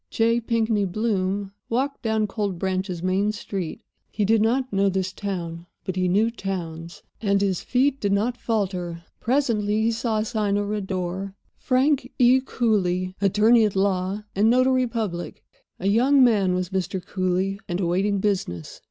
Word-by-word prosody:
J. 230 Hz, +1 st, +2 dB
Pinkney 225 Hz, -3 st, +1 dB
Bloom 195 Hz, -1 st, -1 dB, 0.2 s
walked 270 Hz, +4 st, -1 dB
down 220 Hz, -2 st, +1 dB
Cold 200 Hz, -3 st, -3 dB
Branch's 185 Hz, -1 st, -2 dB
main 190 Hz, +3 st, +1 dB
street. 195 Hz, -5 st, -5 dB, 0.3 s
He 210 Hz, -, -1 dB
did 220 Hz, +1 st, +3 dB
not 255 Hz, +2 st, +1 dB
know 195 Hz, 0 st, +3 dB
this 190 Hz, 0 st, -2 dB
town, 175 Hz, -4 st, -5 dB, 0.2 s
but 185 Hz, -2 st, -4 dB
he 185 Hz, -1 st, +1 dB
knew 210 Hz, +6 st, +2 dB
towns, 170 Hz, -6 st, -6 dB, 0.2 s
and 200 Hz, -2 st, +2 dB
his 195 Hz, -3 st, 0 dB
feet 270 Hz, +2 st, +1 dB
did 200 Hz, -, 0 dB
not 215 Hz, +5 st, +1 dB
falter. 185 Hz, -8 st, -2 dB, 0.2 s
Presently 225 Hz, -5 st, +1 dB
he 230 Hz, -, +2 dB
saw 225 Hz, -1 st, -1 dB
a 215 Hz, -, 0 dB
sign 210 Hz, -3 st, 0 dB
over 205 Hz, 0 st, -1 dB
a 210 Hz, -, -1 dB
door: 190 Hz, 0 st, -4 dB, 0.2 s
"Frank 260 Hz, 0 st, +1 dB
E. 255 Hz, +1 st, +5 dB
Cooly, 185 Hz, -8 st, 0 dB
Attorney 215 Hz, +4 st, +4 dB
at 210 Hz, -2 st, 0 dB
Law 190 Hz, +1 st, 0 dB
and 210 Hz, +3 st, +4 dB
Notary 255 Hz, +1 st, +3 dB
Public." 215 Hz, -7 st, -4 dB, 0.4 s
A 190 Hz, -, -2 dB
young 255 Hz, +6 st, +5 dB
man 200 Hz, -7 st, +3 dB
was 180 Hz, -1 st, -2 dB
Mr. 190 Hz, 0 st, -2 dB
Cooly, 190 Hz, +1 st, -1 dB
and 175 Hz, +1 st, -1 dB
awaiting 190 Hz, +3 st, +1 dB
business. 185 Hz, -, -2 dB
200 Hz, 160 wpm, -24 LUFS, 185-225 Hz, 0.4 s, E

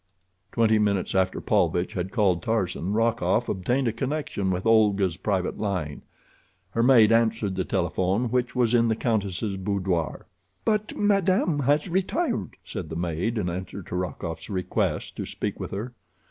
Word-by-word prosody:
Twenty 110 Hz, -2 st, +3 dB
minutes 100 Hz, -3 st, +1 dB
after 95 Hz, -1 st, +1 dB
Paulvitch 90 Hz, +1 st, +1 dB
had 95 Hz, +1 st, -3 dB
called 95 Hz, -7 st, +2 dB
Tarzan, 95 Hz, -4 st, -1 dB
Rokoff 115 Hz, -1 st, +1 dB
obtained 125 Hz, +8 st, 0 dB
a 115 Hz, -, 0 dB
connection 135 Hz, -6 st, -2 dB
with 90 Hz, +2 st, -2 dB
Olga's 100 Hz, -5 st, +3 dB
private 95 Hz, -1 st, -1 dB
line. 90 Hz, -8 st, -2 dB, 0.7 s
Her 115 Hz, -, 0 dB
maid 115 Hz, -3 st, +6 dB
answered 115 Hz, -3 st, +2 dB
the 95 Hz, -, 0 dB
telephone 95 Hz, +6 st, 0 dB
which 125 Hz, 0 st, 0 dB
was 120 Hz, -2 st, +2 dB
in 115 Hz, -1 st, +4 dB
the 110 Hz, -, +2 dB
countess' 100 Hz, -3 st, -1 dB
boudoir. 95 Hz, -4 st, -2 dB, 0.4 s
"But 215 Hz, -1 st, 0 dB
madame 195 Hz, -6 st, +2 dB
has 145 Hz, +4 st, +2 dB
retired," 185 Hz, -, -1 dB
said 80 Hz, -, -6 dB
the 80 Hz, -, -5 dB
maid, 90 Hz, +7 st, -1 dB
in 100 Hz, -4 st, -1 dB
answer 90 Hz, +2 st, -5 dB
to 90 Hz, -, -6 dB
Rokoff's 85 Hz, -2 st, -4 dB
request 95 Hz, -3 st, -2 dB
to -, -, -3 dB
speak -, -, -4 dB
with -, -, -4 dB
her. 115 Hz, +6 st, -5 dB
105 Hz, 155 wpm, -26 LUFS, 90-120 Hz, 0.7 s, maid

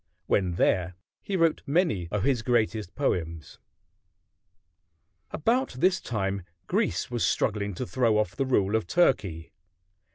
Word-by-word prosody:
When 95 Hz, -2 st, +1 dB
there 90 Hz, 0 st, +1 dB, 0.3 s
he 200 Hz, -, -3 dB
wrote 165 Hz, -2 st, +2 dB
many 145 Hz, -, +1 dB
of 105 Hz, 0 st, -1 dB
his 130 Hz, -3 st, +1 dB
greatest 110 Hz, -5 st, 0 dB
poems. 85 Hz, -, -2 dB, 1.7 s
About 245 Hz, -, 0 dB
this 180 Hz, +9 st, +2 dB
time 100 Hz, -3 st, -2 dB, 0.2 s
Greece 90 Hz, -, -1 dB
was 120 Hz, -2 st, -1 dB
struggling 100 Hz, -3 st, 0 dB
to -, -, -3 dB
throw 115 Hz, +3 st, +1 dB
off 105 Hz, -5 st, 0 dB
the 135 Hz, -, -1 dB
rule 105 Hz, -5 st, +2 dB
of 110 Hz, -, 0 dB
Turkey. 95 Hz, -, +1 dB
110 Hz, 130 wpm, -27 LUFS, 95-135 Hz, 1.7 s, wrote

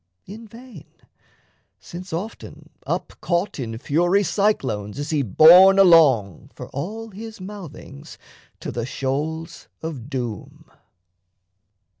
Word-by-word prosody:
in 220 Hz, +4 st, -11 dB
vain, 230 Hz, -, -14 dB, 0.9 s
since, 180 Hz, +2 st, -10 dB
often 185 Hz, +8 st, -7 dB, 0.2 s
up -, -, -3 dB
caught 175 Hz, -1 st, -1 dB
In 115 Hz, -3 st, -5 dB
fury 175 Hz, -, +1 dB
cyclones, 135 Hz, -, -1 dB
is 145 Hz, +2 st, -4 dB
he 150 Hz, -2 st, +1 dB
borne 170 Hz, -, +7 dB
along, 150 Hz, -, +4 dB
For -, -, -9 dB
all 215 Hz, +11 st, -6 dB
his 220 Hz, +2 st, -10 dB
mouthings, 185 Hz, -, -11 dB, 0.4 s
to -, -, -5 dB
the 120 Hz, 0 st, -4 dB
shoals 160 Hz, +6 st, -4 dB, 0.2 s
of 140 Hz, -6 st, -6 dB
doom. 120 Hz, -7 st, -6 dB
165 Hz, 110 wpm, -22 LUFS, 135-195 Hz, 0.9 s, borne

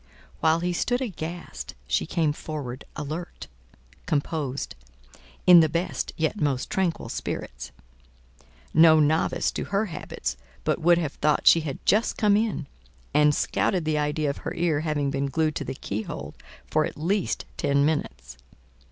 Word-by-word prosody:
While 160 Hz, +1 st, +3 dB
he 175 Hz, 0 st, 0 dB
stood 245 Hz, +8 st, 0 dB
aghast, 170 Hz, -, -6 dB
she -, -, 0 dB
came 155 Hz, -3 st, +1 dB
forward 145 Hz, -5 st, -6 dB
alert, 155 Hz, +4 st, -5 dB, 0.6 s
composed, 145 Hz, -2 st, -2 dB, 0.7 s
in 180 Hz, -1 st, +10 dB
the 160 Hz, -1 st, +4 dB
best 170 Hz, +4 st, -2 dB
yet 160 Hz, +6 st, -1 dB
most 140 Hz, -4 st, 0 dB
tranquil 190 Hz, -4 st, 0 dB
spirits: 60 Hz, +2 st, -5 dB, 1.0 s
no 160 Hz, 0 st, +7 dB
novice 155 Hz, +2 st, +2 dB
to -, -, -4 dB
her 200 Hz, +2 st, 0 dB
habits -, -, -4 dB, 0.3 s
but -, -, 0 dB
would 170 Hz, +1 st, +5 dB
have 155 Hz, -5 st, -2 dB
thought 150 Hz, 0 st, +1 dB
she 165 Hz, -, +8 dB
had 150 Hz, -4 st, -4 dB
just 215 Hz, +3 st, +2 dB
come 205 Hz, -2 st, +4 dB
in, 215 Hz, -8 st, 0 dB, 0.5 s
and 150 Hz, 0 st, +5 dB
scouted 180 Hz, -4 st, 0 dB
the 155 Hz, -1 st, +1 dB
idea 150 Hz, 0 st, 0 dB
of -, -, -8 dB
her -, -, -5 dB
ear 165 Hz, -3 st, +1 dB
having 150 Hz, -3 st, -1 dB
been 140 Hz, 0 st, -1 dB
glued 155 Hz, +3 st, 0 dB
to -, -, -3 dB
the 135 Hz, -, -5 dB
key 105 Hz, -4 st, -4 dB
hole -, -, -7 dB, 0.3 s
for -, -, +1 dB
at -, -, -5 dB
least 185 Hz, +6 st, -1 dB
ten 140 Hz, 0 st, +2 dB
minutes. 65 Hz, -, -2 dB
155 Hz, 155 wpm, -26 LUFS, 140-170 Hz, 1.0 s, in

